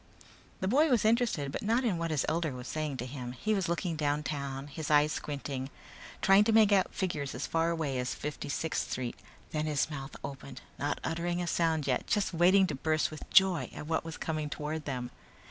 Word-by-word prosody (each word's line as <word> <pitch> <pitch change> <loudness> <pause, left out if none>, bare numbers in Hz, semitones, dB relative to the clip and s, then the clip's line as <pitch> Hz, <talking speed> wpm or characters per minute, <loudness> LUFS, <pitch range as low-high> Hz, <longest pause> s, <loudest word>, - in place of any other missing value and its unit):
The 190 - 0
boy 295 +9 +4
was 245 -5 +3
interested 220 - +2
but - - -4
not 230 +5 +2
in 200 -9 +1
what 165 0 -1
his 155 -4 +1
elder 160 -2 0
was 125 0 -7
saying 155 -2 -2
to 125 - -4
him. 125 -2 -6
He 215 - -1
was 195 -5 0
looking 170 0 -1
downtown, 145 -2 -2
his 150 +1 -6
eyes 150 0 +5
squinting, 140 -3 -4 0.5
trying 195 +1 +7
to 225 - +3
make 220 -2 +6
out 195 -2 +3
figures 150 -8 -2
as 125 - -3
far 165 0 +1
away 155 -6 -1
as 125 0 -2
Fifty 150 -1 -5
sixth 160 +2 -1
Street. 125 -2 -3 0.4
Then 155 0 -1
his 150 0 0
mouth 135 -2 -6
opened, 135 0 -7 0.2
not 145 +1 -1
uttering 175 +2 -1
a 175 - -1
sound 165 -3 +1
yet, 125 -2 0
just 205 -3 +1
waiting 185 +3 +5
to 155 - -3
burst 155 +4 0
with 155 - -9
joy 190 -3 +5
at - - -6
what 160 +1 0
was 165 -1 -6
coming 155 -2 -2
toward 150 +1 -4
them. 125 -3 -3
155 Hz, 210 wpm, -31 LUFS, 140-175 Hz, 0.5 s, trying